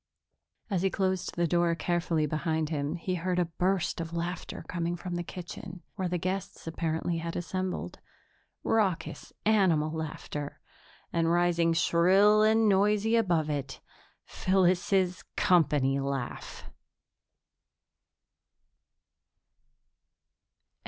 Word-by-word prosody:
As 185 Hz, -3 st, +1 dB
he 195 Hz, -, +2 dB
closed 190 Hz, -1 st, -1 dB
the 170 Hz, -, +1 dB
door 170 Hz, 0 st, +2 dB
carefully 170 Hz, -2 st, 0 dB
behind 155 Hz, +1 st, -1 dB
him, 150 Hz, 0 st, -2 dB
he 180 Hz, +2 st, -3 dB
heard 180 Hz, +1 st, -1 dB
a 180 Hz, -, +3 dB
burst 175 Hz, +1 st, -1 dB
of 165 Hz, 0 st, -6 dB
laughter 170 Hz, +1 st, -4 dB
coming 170 Hz, -1 st, -2 dB
from 180 Hz, +1 st, -6 dB
the 175 Hz, -, -1 dB
kitchen, 175 Hz, +1 st, -8 dB
where 190 Hz, -3 st, -2 dB
the 180 Hz, 0 st, -1 dB
guests 185 Hz, +2 st, -4 dB
apparently 165 Hz, +1 st, -2 dB
had 165 Hz, 0 st, -5 dB
assembled 185 Hz, +2 st, -3 dB, 0.6 s
raucous 200 Hz, -6 st, 0 dB
animal 180 Hz, -8 st, +3 dB
laughter 150 Hz, -2 st, -5 dB, 0.5 s
and, 165 Hz, -1 st, +2 dB
rising 170 Hz, -1 st, +3 dB
shrill 190 Hz, +6 st, +4 dB
and 220 Hz, +1 st, +4 dB
noisy 210 Hz, +3 st, +3 dB
above 175 Hz, -9 st, +2 dB
it, 140 Hz, -3 st, -3 dB, 0.5 s
Phyllis's 185 Hz, 0 st, +1 dB
company 150 Hz, -8 st, +3 dB
laugh. 135 Hz, -2 st, -4 dB
175 Hz, 105 wpm, -29 LUFS, 165-185 Hz, 0.6 s, shrill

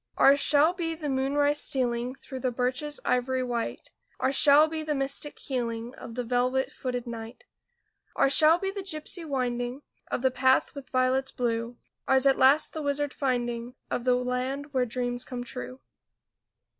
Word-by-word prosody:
Ours 280 Hz, +1 st, +6 dB
shall 295 Hz, +4 st, +4 dB
be 330 Hz, -3 st, -3 dB
the 305 Hz, -2 st, -5 dB
moonrise 285 Hz, +2 st, +1 dB
stealing 245 Hz, -1 st, -1 dB
Through 265 Hz, -1 st, -9 dB
the 255 Hz, -, 0 dB
birches 255 Hz, +5 st, -1 dB
ivory 255 Hz, +1 st, 0 dB
white; 240 Hz, -2 st, -4 dB, 0.3 s
Ours 265 Hz, +1 st, +1 dB
shall 295 Hz, +2 st, +7 dB
be 315 Hz, 0 st, -4 dB
the 305 Hz, -1 st, -2 dB
mystic 275 Hz, +2 st, -2 dB
healing 235 Hz, -2 st, -4 dB
Of 230 Hz, -, -10 dB
the 250 Hz, -, -2 dB
velvet 250 Hz, +2 st, 0 dB
footed 250 Hz, -1 st, -4 dB
night. 230 Hz, 0 st, -8 dB, 0.7 s
Ours 275 Hz, -, +3 dB
shall 315 Hz, +1 st, +7 dB
be 390 Hz, +2 st, -3 dB
the 395 Hz, 0 st, -5 dB
gypsy 340 Hz, -1 st, -3 dB
winding 250 Hz, -2 st, -3 dB, 0.3 s
Of 245 Hz, -, -3 dB
the 260 Hz, -, +3 dB
path 260 Hz, +1 st, +2 dB
with 280 Hz, -2 st, -10 dB
violets 260 Hz, +1 st, +1 dB
blue, 235 Hz, 0 st, -3 dB, 0.3 s
Ours 265 Hz, 0 st, +4 dB
at 270 Hz, -1 st, +4 dB
last 275 Hz, +4 st, +4 dB
the 315 Hz, -, -4 dB
wizard 285 Hz, 0 st, -1 dB
finding 240 Hz, -2 st, -2 dB, 0.2 s
Of 240 Hz, -, -2 dB
the 250 Hz, 0 st, +3 dB
land 255 Hz, +3 st, -3 dB
where 255 Hz, -2 st, +1 dB
dreams 245 Hz, +1 st, -2 dB
come 245 Hz, -1 st, -6 dB
true. 125 Hz, -, -8 dB
260 Hz, 170 wpm, -27 LUFS, 245-285 Hz, 0.7 s, shall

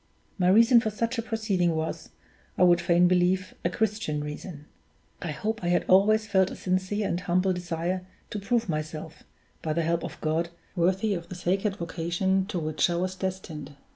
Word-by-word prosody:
My 180 Hz, -, +3 dB
reason 230 Hz, +4 st, +7 dB
for 220 Hz, -, -1 dB
such 230 Hz, +3 st, -2 dB
a -, -, +1 dB
proceeding 205 Hz, -7 st, 0 dB
was, 160 Hz, 0 st, -3 dB, 0.5 s
I -, -, +4 dB
would 175 Hz, -1 st, +5 dB
fain 175 Hz, +1 st, +4 dB
believe, 185 Hz, +1 st, +2 dB
a 170 Hz, -, +2 dB
Christian 200 Hz, -7 st, -1 dB
reason. 150 Hz, +1 st, -7 dB, 0.6 s
I 175 Hz, -, -4 dB
hope 210 Hz, +9 st, -3 dB
I -, -, -1 dB
had 175 Hz, 0 st, +2 dB
always 215 Hz, +3 st, +5 dB
felt 190 Hz, -3 st, +3 dB
a -, -, -7 dB
sincere 190 Hz, +3 st, -1 dB
and 170 Hz, -, -1 dB
humble 185 Hz, +1 st, +1 dB
desire 180 Hz, +1 st, -3 dB, 0.2 s
to 210 Hz, -, -3 dB
prove 230 Hz, +3 st, 0 dB
myself, 155 Hz, -1 st, -4 dB, 0.4 s
by 155 Hz, -, -1 dB
the 170 Hz, +1 st, 0 dB
help 170 Hz, +1 st, 0 dB
of -, -, -7 dB
God, 160 Hz, +2 st, 0 dB, 0.3 s
worthy 190 Hz, +4 st, +2 dB
of 170 Hz, -2 st, -5 dB
the 185 Hz, -, -6 dB
sacred 195 Hz, +3 st, 0 dB
vocation 185 Hz, +2 st, -1 dB
to 205 Hz, -4 st, -3 dB
which 155 Hz, 0 st, +1 dB
I 175 Hz, -, 0 dB
was 185 Hz, +2 st, -1 dB
destined. 185 Hz, -6 st, -5 dB
180 Hz, 185 wpm, -27 LUFS, 170-195 Hz, 0.6 s, reason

